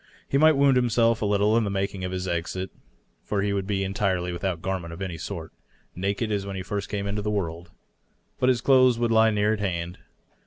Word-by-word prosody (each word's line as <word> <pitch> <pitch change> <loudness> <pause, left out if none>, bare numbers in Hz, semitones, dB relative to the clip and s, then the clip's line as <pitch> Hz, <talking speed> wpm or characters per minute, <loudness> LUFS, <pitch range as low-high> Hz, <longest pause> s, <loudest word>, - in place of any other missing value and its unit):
He 140 - +1
might 155 -1 +6
wound 140 -2 +5
himself 115 -2 +2
a 105 - +1
little 105 +1 +3
in 110 -3 +1
making 100 -1 -2
his 90 0 -3
exit, 90 +2 -3 0.5
for 100 -1 -1
he 100 0 0
would 100 -1 -2
be 100 -1 0
en 95 - -3
tirely 95 -5 0
without 85 0 -2
garment 95 -3 -3
of 85 - -9
any 90 -4 -4
sort, - - -6 0.4
naked 100 +4 -1
as 100 -2 0
when 100 0 -6
he 95 - -4
first 100 +1 -4
came 100 -1 -3
into 100 +1 -2
the 105 - -2
world. 85 -4 -3 0.7
But 125 - +3
his 125 -2 +2
clothes 130 -3 +5
would 120 -1 0
lie 110 0 +5
near 105 0 +2
at 110 - -3
hand. 90 -3 -3
100 Hz, 220 wpm, -25 LUFS, 95-110 Hz, 0.7 s, might